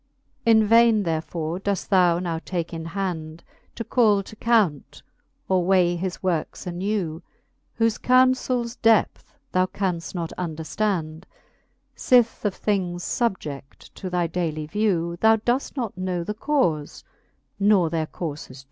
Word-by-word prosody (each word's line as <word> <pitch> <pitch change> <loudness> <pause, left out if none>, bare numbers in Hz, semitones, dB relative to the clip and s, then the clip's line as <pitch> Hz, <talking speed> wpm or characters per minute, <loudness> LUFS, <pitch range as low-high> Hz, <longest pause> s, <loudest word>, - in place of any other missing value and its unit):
In 220 -1 +6
vaine 230 -1 +5
therefore 165 0 -3
doeft 200 0 -2
thou 180 -3 +4
now 170 -2 -3
take 175 -2 -4
in 165 -1 -5
hand, 165 -3 -4 0.3
To 230 - -4
call 215 -5 +3
to 220 - -12
count, 215 - 0 0.4
or 185 -1 +2
weigh 180 -1 +3
his 180 +1 -4
works 175 -2 -2
anew, 180 -2 -2 0.6
Whoie 225 -1 +1
counlels 255 -2 +2
depth 225 -2 +2 0.2
thou 185 0 +2
canft 180 -4 -3
not 170 -2 -4
underftand, 165 0 -3 0.7
Sith 245 -2 +3
of 205 - 0
things 180 -4 -1
fubje6i 150 - -4
to 190 - -6
thy 180 -1 0
daily 160 -2 -2
vew 170 -2 -1
Thou 220 +2 +5
doeft 245 +6 -1
not 235 -7 -3
know 185 -2 -2
the 210 - -4
caufes, 210 - -1 0.6
nor 195 -5 +3
their 160 -2 -1
courfes 155 -4 -6
dew. 130 +1 -12
185 Hz, 140 wpm, -24 LUFS, 165-215 Hz, 0.7 s, In